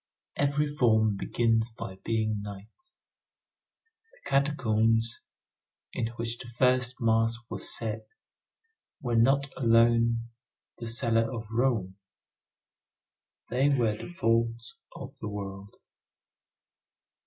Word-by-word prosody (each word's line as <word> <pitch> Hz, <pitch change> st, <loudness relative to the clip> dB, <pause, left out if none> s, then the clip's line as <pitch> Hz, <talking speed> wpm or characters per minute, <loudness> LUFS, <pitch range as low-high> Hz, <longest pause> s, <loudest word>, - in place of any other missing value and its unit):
Every 145 Hz, +1 st, +1 dB
form 110 Hz, -8 st, +2 dB
begins 115 Hz, +2 st, +1 dB
by 95 Hz, -4 st, -8 dB
being 110 Hz, -2 st, 0 dB
night. 105 Hz, -, -11 dB, 1.3 s
The -, -, -8 dB
catacombs, 115 Hz, -5 st, +2 dB, 0.7 s
in 115 Hz, -, -1 dB
which 115 Hz, 0 st, -4 dB
the -, -, -8 dB
first 125 Hz, +1 st, +1 dB
mass 115 Hz, 0 st, +2 dB, 0.2 s
was -, -, +1 dB
said, 110 Hz, -1 st, -4 dB, 0.9 s
were 120 Hz, -5 st, -2 dB
not 135 Hz, +4 st, +3 dB
alone 115 Hz, -1 st, +3 dB, 0.5 s
the 115 Hz, -, -5 dB
cellar 115 Hz, 0 st, +2 dB
of 115 Hz, -3 st, -5 dB
Rome, 110 Hz, -6 st, 0 dB, 1.5 s
they 130 Hz, +4 st, +2 dB
were 120 Hz, -6 st, +2 dB
the -, -, -8 dB
vaults 115 Hz, -6 st, -1 dB, 0.2 s
of -, -, -9 dB
the -, -, -5 dB
world. 100 Hz, -1 st, -7 dB
115 Hz, 100 wpm, -28 LUFS, 110-125 Hz, 1.5 s, not